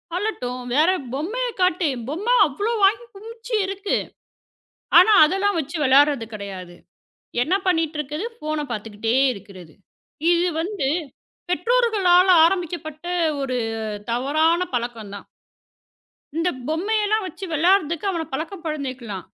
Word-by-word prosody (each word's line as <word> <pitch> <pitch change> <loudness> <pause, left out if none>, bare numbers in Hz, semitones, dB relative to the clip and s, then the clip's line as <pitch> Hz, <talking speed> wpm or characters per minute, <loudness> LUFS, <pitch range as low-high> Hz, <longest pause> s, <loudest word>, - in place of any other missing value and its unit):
அழட்டும். 255 - -3
வேற 310 +6 +4 0.2
பொம்மைய 420 - -2
காட்டி. 365 -3 +2 0.2
பொம்மை 400 - 0
அவ்ளோ 405 - -2
வாங்கி 420 +5 +3
குமுச்சி 455 +3 -10
இருக்கு. 390 +1 -2 1.0
ஆனா 370 +5 +7
அதெல்லாம் 390 +4 0
வச்சு 310 +3 -4
விளையாடுறது 275 -2 +4
கிடையாது. 190 -4 -8 0.7
என்ன 335 +8 +1
பண்ணிட்டு 325 -3 +1
இருக்குது? 300 +7 -4
ஃபோன 305 -1 -3
பார்த்துக்கிட்டே 225 +1 -2 0.2
இருக்குறது. 185 -5 -13 0.6
இது 350 +1 +2
வந்து 365 -5 -2 0.6
பெற்றோர்களால 395 -4 +3 0.2
ஆரம்பிக்கப்பட்ட 335 -3 -3 0.4
ஒரு 260 -2 -2 0.5
தவறான 310 +7 +2 0.2
பழக்கம் 230 -4 -4
தான். 200 - -10 1.1
இந்தப் 330 -5 -1
பொம்மைய 405 +8 0
எல்லாம் 430 0 0
வச்சு 380 +1 -7
விளையாடுறதுக்கு 335 +1 +2
அவனப் 330 -4 -4
பழக்கம் 330 +6 -5
படுத்திக்கலாம். 260 - -5
320 Hz, 110 wpm, -22 LUFS, 265-385 Hz, 1.1 s, ஆனா